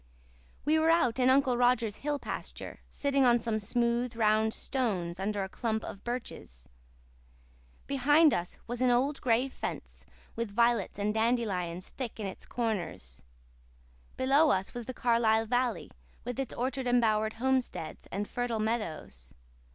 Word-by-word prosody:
We 310 +2 +3
were 320 +1 +3
out 265 -8 +3
in 255 0 +4
Uncle 260 -2 +4
Roger's 240 -3 +2
hill 290 0 -2
pasture, - - -6
sitting 280 -1 +1
on 240 -1 +5
some 225 -2 -1
smooth, 235 +3 0
round 220 0 +3
stones 190 -11 -2
under 200 +1 -1
a - - -3
clump 220 +2 -2
of 200 - -8
birches. 235 - -6 1.2
Behind 290 +3 +4
us 175 0 -3
was 240 +1 -5
an 255 - +4
old 265 +4 +1
gray 245 +1 +2
fence, 270 - -6 0.3
with 230 -1 -2
violets 235 -2 +2
and 205 +1 0
dandelions 210 -7 -1
thick 245 -4 -6
in 210 - -3
its 190 - -7
corners. 180 - -3 1.0
Below 280 +4 +4
us 190 -5 0
was 240 -2 -6
the 255 - -5
Carlisle 225 -2 +3
valley, 245 -3 -1 0.3
with 245 +1 -4
its 270 - -2
orchard 260 +1 -2
embowered 220 -3 +2
homesteads, 255 -8 -2
and 205 +1 -3
fertile 245 -2 -2
meadows. 165 - -3
235 Hz, 145 wpm, -30 LUFS, 215-255 Hz, 1.2 s, on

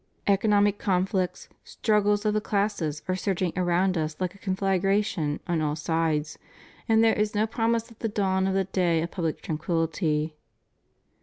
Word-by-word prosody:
Economic 205 0 +3
conflicts, 185 -1 0 0.2
struggles 210 -1 +1
of 210 - +2
the 215 - +1
classes 200 -9 -1
are 185 - 0
surging 185 -2 -1
around 180 +1 +1
us 155 0 -2
like 185 -2 -2
a 200 - -18
conflagration 195 -4 0
on 170 -2 0
all 150 -1 0
sides, 160 -1 -1 0.5
and 225 0 +5
there 225 - +5
is 210 0 -1
no 210 +1 +3
promise 230 +1 -1
of 230 - -17
the 225 - -1
dawn 190 -2 +1
of 190 - 0
the 195 - +2
day 175 -3 +1
of 170 - -5
public 165 -4 -3
tranquillity. 160 -1 -1
190 Hz, 160 wpm, -26 LUFS, 165-205 Hz, 0.5 s, and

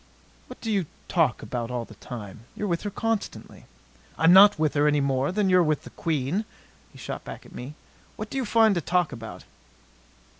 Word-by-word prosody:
"What - - -11
do 225 - -2
you 195 -6 0 0.2
talk 160 -9 +1
about 115 +1 -4
all 120 -2 -3
the 110 - -14
time? 105 -1 -9
You're 210 - -3
with 170 -3 -1
her 205 - -3
constantly." 225 +1 -4 0.5
"I'm 160 +3 +6
not 200 0 +8
with 155 -1 +1
her 145 0 +3
any 150 0 +3
more 135 +1 +1
than 205 +1 +1
you're 185 -1 +5
with 155 -3 +1
the - - -11
Queen," 160 +4 -1 0.5
he - - -16
shot - - -6
back - - -9
at - - -15
me. 135 +5 -8 0.4
"What 215 0 -7
do - - -3
you - - 0
find 225 -1 +4
to 175 - -1
talk 175 +1 +1
about?" 115 -2 -8
160 Hz, 200 wpm, -26 LUFS, 130-195 Hz, 0.5 s, not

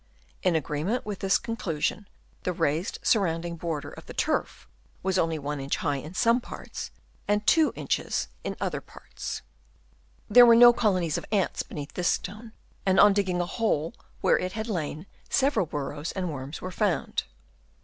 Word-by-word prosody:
In 180 -3 +2
agreement 160 - -1
with 205 -2 -4
this 195 0 +3
con 230 -1 -4
clusion, 175 +1 -2 0.4
the 180 - -1
raised 160 +4 0
surrounding 170 -5 +1
border 160 -3 -4
of - - -12
turf - - -1 0.4
was 190 0 +1
only 165 -1 +1
1 145 0 -4
inch 135 +1 -1
high 145 -3 0
in 155 +6 -8
some 235 +3 +3
parts, - - -7 0.4
and 210 +1 +1
2 320 -2 +5
inches - - -1 0.2
in - - -3
other - - -2
parts. - - -7 0.8
There 245 -1 +8
were 230 - +8
no 240 +1 +9
colonies 185 -9 +1
of - - -11
ants 200 -4 +1
beneath 145 -1 -7
this 180 -1 -1
stone, 215 +4 -2 0.3
and 190 0 +3
on 205 -1 +8
digging 190 -3 +1
a - - 0
hole 170 -5 0 0.3
where - - +4
it 185 0 -3
had 220 +2 -4
lain, 160 -5 -3 0.2
several 270 - +2
burrows 145 +2 -4
and 180 -4 -2
worms 135 +2 -6
were 185 - -4
found. 195 -2 0
180 Hz, 170 wpm, -27 LUFS, 155-210 Hz, 0.8 s, no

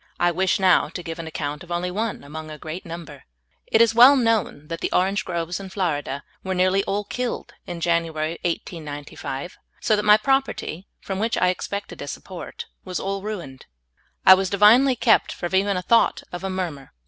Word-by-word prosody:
I 175 0 +3
wish 185 +3 +1
now 185 -2 +4
to 180 - -7
give 165 0 -6
an 165 - -5
account 150 0 -4
of 175 - -13
only 175 +1 -1
one 215 0 -3
among 155 +2 -8
a 155 - -8
great 160 +4 -7
number. 170 -1 -9 0.4
It 220 - +4
is 230 -1 +5
well 250 +5 +8
known 225 - 0
that 165 +1 -5
the - - -2
orange 195 +3 +1
groves 170 0 -3
in 195 -1 -8
Florida 150 -7 -2 0.2
were 190 0 -2
nearly 185 +2 +3
all 205 +1 -1
killed 245 +4 -4
in 175 -1 -6
January, 165 -1 0
1895, 150 -3 -5 0.2
so 215 - +2
that 210 - 0
my 210 0 +7
prop 270 +4 +2
erty, 175 +5 -6 0.2
from 195 -1 -4
which 225 +2 0
I 180 - +3
expected 200 +2 -4
a - - -6
support, - - -7 0.2
was 185 -1 -4
all 195 0 -3
ruined. 175 -11 -7 0.6
I 190 - +11
was 190 0 +1
divinely 230 +7 +6
kept 230 -1 +3
from 175 0 -5
even 195 0 +2
a 180 - -3
thought 230 +4 +3
of 175 +1 -6
a 190 - -2
murmur. 170 -8 -5
185 Hz, 195 wpm, -23 LUFS, 165-205 Hz, 0.6 s, I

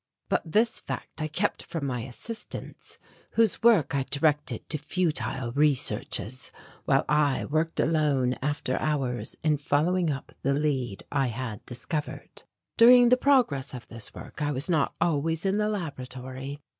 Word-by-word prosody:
But - - +2
this 225 +4 +3
fact - - -6
I 155 - 0
kept 180 +7 -1
from 160 -4 -5
my 125 -3 -2
assistants 135 - -6 0.4
whose 225 -3 +3
work 210 - +4
I 140 - +1
directed 145 -3 0
to 155 - -1
futile 135 -7 -1
researches 130 -4 0 0.4
while - - +3
I 150 -2 +2
worked 155 +2 -1
alone 145 -5 +2
after 145 -2 -1
hours 135 -5 -1
in 155 -1 +3
following 160 +5 +1
up 135 -2 -4
the 140 +1 +1
lead 135 -8 -1
I 135 -2 +1
had 115 -3 -5
discovered. 150 +5 -5 0.3
During 245 +1 +8
the 250 - +7
progress 240 - +2
of 125 - -9
this 115 -2 -5
work - - -10
I 145 0 +1
was 140 +6 0
not 155 -4 +1
always 160 0 0
in 195 +2 +2
the 210 0 +1
laboratory. 135 -6 -5
145 Hz, 150 wpm, -27 LUFS, 130-165 Hz, 0.4 s, During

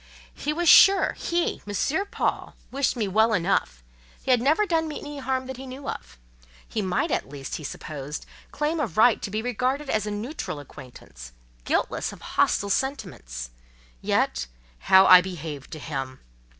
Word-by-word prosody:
He 295 - -3
was 345 +3 -1
sure, 390 +4 +7
he—M. 335 - -1
Paul—wished 275 +1 -2
me 220 -4 -1
well 220 +4 +3
enough; 170 - 0 0.4
he 265 - 0
had 245 -2 +4
never 310 - +3
done 325 -4 0
me 305 - -5
any 295 -1 -7
harm 260 -1 -2
that 260 -1 -7
he 265 +1 -8
knew 260 +2 -8
of; 60 +1 -7 0.5
he 220 - -2
might, 185 -2 -1
at - - -1
least, 140 -1 -6
he 155 - -10
supposed, 145 0 -6 0.2
claim 305 +2 -1
a 300 - 0
right 220 +2 +3
to - - -4
be 215 +2 -3
regarded 255 +4 -1
as 215 -1 0
a - - -2
neutral 210 - -5
acquaintance, 125 - -12 0.3
guiltless - - -1
of - - -13
hostile 200 0 +2
sentiments: 125 - -3 0.5
yet, - - 0 0.3
how 190 - +6
I 185 -1 +9
behaved 160 -6 -7
to - - -6
him! 135 -4 -5
215 Hz, 165 wpm, -25 LUFS, -, 0.5 s, I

